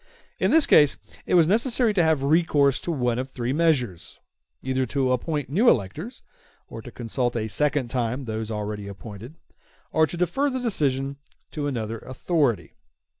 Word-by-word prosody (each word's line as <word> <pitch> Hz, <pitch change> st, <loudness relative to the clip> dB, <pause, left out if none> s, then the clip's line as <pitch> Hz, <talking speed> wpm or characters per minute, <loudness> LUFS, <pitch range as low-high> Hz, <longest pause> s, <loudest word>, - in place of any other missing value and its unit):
In -, -, +2 dB
this 320 Hz, -2 st, +5 dB
case 145 Hz, -2 st, +5 dB, 0.3 s
it -, -, +2 dB
was 170 Hz, -2 st, +6 dB
necessary 230 Hz, +3 st, +3 dB
to 190 Hz, -, +2 dB
have 160 Hz, -4 st, +2 dB
recourse 145 Hz, -3 st, +2 dB
to 175 Hz, -, -3 dB
one 125 Hz, -5 st, 0 dB
of 130 Hz, +1 st, -4 dB
three 125 Hz, -1 st, -3 dB
measures; 140 Hz, -, 0 dB, 0.4 s
either 130 Hz, 0 st, -1 dB
to 130 Hz, +1 st, 0 dB
appoint 145 Hz, +3 st, -1 dB
new 210 Hz, -, +3 dB
electors, 155 Hz, -, -2 dB, 0.4 s
or -, -, -9 dB
to -, -, -10 dB
consult 120 Hz, +1 st, -2 dB
a 110 Hz, -2 st, -2 dB
second 145 Hz, +1 st, 0 dB
time 125 Hz, +2 st, -2 dB
those 110 Hz, -1 st, -4 dB
already 105 Hz, -1 st, -4 dB
appointed, 105 Hz, +6 st, -10 dB, 0.6 s
or 160 Hz, 0 st, +3 dB
to 175 Hz, -, -6 dB
defer 270 Hz, -, 0 dB
the 260 Hz, -, -3 dB
election 140 Hz, -, -1 dB, 0.3 s
to 145 Hz, -2 st, -3 dB
another 115 Hz, -4 st, -3 dB
authority. 130 Hz, -, -1 dB
135 Hz, 165 wpm, -24 LUFS, 120-165 Hz, 0.6 s, was